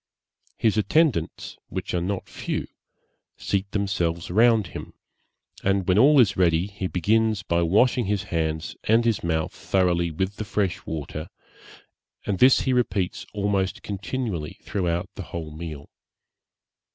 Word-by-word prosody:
His 110 -1 +2
attendants, 120 - +1
which - - -4
are 90 - +1
not 95 +2 -3
few, - - -3 0.7
seat 100 0 -1
themselves 90 -5 -1
round 115 +1 +4
him, - - -8 0.7
and 95 -1 +1
when 95 +2 +4
all 145 +4 +7
is 100 -6 +4
ready, 85 -1 +3
he 100 -2 -4
begins 105 +3 +1
by 85 -2 +1
washing 110 +8 +3
his 100 0 0
hands 80 -1 -2
and 115 +2 +4
his 115 -4 +1
mouth 80 -2 0
thoroughly 90 -3 +1
with 95 +5 -3
the - - -3
fresh 100 -3 -2
water, 80 +1 -5 1.0
and 95 -3 -1
this 130 +1 +6
he 130 - +1
repeats 105 -7 -1
almost 100 -2 -1
continually 100 - -4
throughout 90 -3 -1
the - - -7
whole 80 -2 -5
meal. 75 -2 -7
95 Hz, 140 wpm, -25 LUFS, 85-105 Hz, 1.0 s, all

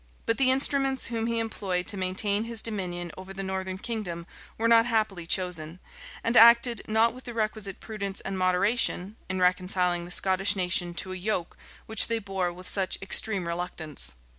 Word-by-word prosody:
But 230 - 0
the 265 -1 +4
instruments 270 0 +1
whom 225 0 -1
he 230 0 -1
employed 195 -5 -2
to 215 - -1
maintain 200 +3 +1
his 230 -1 -5
dominion 175 -5 -3
over 190 +1 -10
the 195 - -4
northern 190 -1 -4
kingdom 190 -6 -5 0.3
were 230 - +1
not 230 0 +5
happily 215 -7 -1
chosen, 175 -2 -2 0.4
and 230 - 0
acted 235 0 +6
not 220 +1 +3
with 255 +1 -12
the 240 -2 -7
requisite 215 -3 -3
prudence 200 -3 -5
and 195 - -5
moderation, 190 +2 +1
in 185 0 -2
reconciling 180 -1 +1
the - - -10
Scottish 190 +2 +2
nation 180 -2 0
to 185 +1 -2
a - - -5
yoke 180 -2 -2 0.3
which 220 -2 +4
they 230 - 0
bore 195 -4 -2
with 180 +1 -11
such 190 -2 -1
extreme 195 -1 +2
reluctance. 170 - -1
195 Hz, 175 wpm, -27 LUFS, 180-225 Hz, 0.4 s, acted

